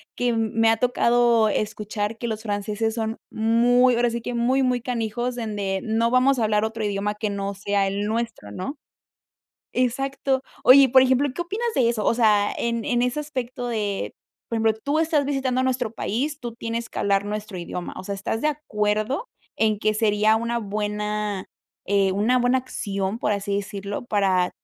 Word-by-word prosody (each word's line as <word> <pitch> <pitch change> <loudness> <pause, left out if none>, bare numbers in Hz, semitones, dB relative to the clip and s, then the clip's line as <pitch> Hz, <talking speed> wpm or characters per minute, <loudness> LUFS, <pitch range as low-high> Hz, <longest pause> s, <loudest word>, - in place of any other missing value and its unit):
que 245 0 0
m 225 -2 0
me 225 0 +4
ha 225 - +2
tocado 235 -2 +3
escuchar 210 +1 -2
que 235 - -4
los 220 -1 -3
franceses 210 +1 -2
son 225 0 -2
muy, 240 +3 +3
ahora 240 0 +2
sí 235 0 -4
que, 245 - -4
muy, 255 +3 +2
muy 250 -2 +1
canijos, 240 0 -2
donde: 205 -5 -2
"No 225 +1 +1
vamos 255 +1 +3
a - - +1
hablar 210 0 +2
otro 220 0 -4
idioma 205 0 -1
que 210 0 -3
no 200 0 -3
sea 200 0 0
el 200 +1 -2
nuestro", 225 - -3
¿no? 185 - -5 1.0
Exacto. 265 +1 0 0.2
Oye, 260 +3 +9
y - - +5
por 260 +1 +6
ejemplo, 260 +2 +2
¿qué - - -2
opinas 420 +7 -3
de 245 -3 +3
eso?, 230 -3 0
o 230 - +2
sea, 210 -3 +3
en 235 -1 -1
en 240 0 +1
ese 250 +4 0
aspecto 255 -4 -4
de, 210 -4 -2 0.3
por 230 - -2
ejemplo, 220 0 +2
tú 285 +2 0
estás 315 -2 +2
visitando 265 -2 0
nuestro 255 -3 0
país, 285 +9 -2
tú 235 -2 -6
tienes 230 0 -4
que - - -10
hablar 200 0 +1
nuestro 210 -2 -5
idioma, 175 +1 -5
o - - -7
sea, 200 +1 -4
¿estás 215 +3 -3
de - - +2
acuerdo 240 - -1 0.3
en 215 -2 +2
que 215 +1 +1
sería 215 0 +3
una 235 +1 -1
buena, 210 -1 -2 0.4
eh, 195 -1 +2
una 225 +6 +2
buena 245 +1 +3
acción, 200 -5 -3
por 210 - +1
así 200 0 -2
decirlo, 200 +1 -5
para 190 -4 +2
225 Hz, 190 wpm, -24 LUFS, 210-245 Hz, 1.0 s, Oye